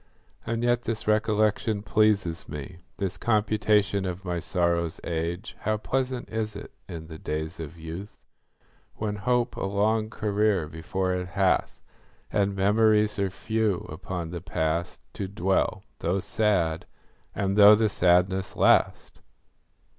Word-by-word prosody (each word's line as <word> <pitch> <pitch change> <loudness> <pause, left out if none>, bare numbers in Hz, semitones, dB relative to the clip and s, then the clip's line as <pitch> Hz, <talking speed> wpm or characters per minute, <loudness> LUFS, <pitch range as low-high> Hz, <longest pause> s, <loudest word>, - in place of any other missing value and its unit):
And 115 0 -1
yet 120 0 +2
this 115 -3 -4
recollection 110 -1 +1
pleases 105 -5 +1
me, 75 +4 -7 0.2
This 95 -2 -3
computation 105 -2 +2
of 95 0 -5
my 90 -1 -1
sorrow's 85 -2 0
age. 85 +5 -3
How 110 0 0
pleasant 130 +2 -2
is 110 -2 -3
it, 100 - -8 0.2
in 85 -3 -7
the 80 -1 -10
days 80 +3 -4
of 80 +1 -7
youth, 85 +6 -8 0.7
When 105 -1 -3
hope 120 +4 0
a - - -4
long 105 +2 +1
career 105 -5 0
before 80 +4 -2
it 90 0 -3
hath, 95 0 +1 0.5
And 100 -1 +1
memories 105 +1 +3
are 100 -1 +1
few, 110 0 -1
upon 85 +1 -5
the 85 -2 -5
past 85 -1 -2
To 95 - -4
dwell, 95 +1 0 0.2
though 90 +3 0
sad, 95 -6 0 0.5
and 100 -1 0
though 105 0 +9
the 110 +1 +2
sadness 95 0 +2
last! - - +2
100 Hz, 135 wpm, -26 LUFS, 85-110 Hz, 0.7 s, though